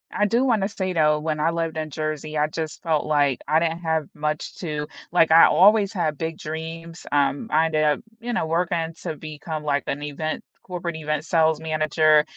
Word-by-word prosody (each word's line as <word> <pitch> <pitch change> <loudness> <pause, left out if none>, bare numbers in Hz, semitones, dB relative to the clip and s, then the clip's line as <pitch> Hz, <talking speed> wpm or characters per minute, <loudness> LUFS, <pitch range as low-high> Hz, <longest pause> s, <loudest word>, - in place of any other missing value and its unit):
I 210 - +2
do 230 +5 +2
wanna 220 -6 +2
say 190 -3 -3
though, 150 -2 +3
when 155 0 -2
I 155 +2 +2
lived 165 -1 -2
in 155 -1 -3
Jersey, 155 0 -4
I 150 0 +2
just 155 0 -5
felt 160 -3 +1
like 145 -4 +2
I 155 - +4
didn't 165 0 -1
have 160 -3 -1
much 150 0 -3
to 150 -4 -3 0.2
like, 165 -2 +4
I 165 +1 +9
always 205 +2 +5
had 160 -6 -1
big 160 +1 -3
dreams, 165 +2 -7
um, 145 -1 +1
I 160 +2 +4
ended 155 -1 +1
up, 150 -1 +2 0.2
you 240 +1 -4
know, 230 - 0
working 165 0 -1
to 155 - -3
become, 155 0 -6
like, 145 -1 0
an 145 - -2
event 150 +2 -4 0.2
corporate 175 -2 -5
event 155 -1 -2
sales 160 -2 +2
manager, 155 -1 +3
160 Hz, 200 wpm, -23 LUFS, 150-170 Hz, 0.2 s, I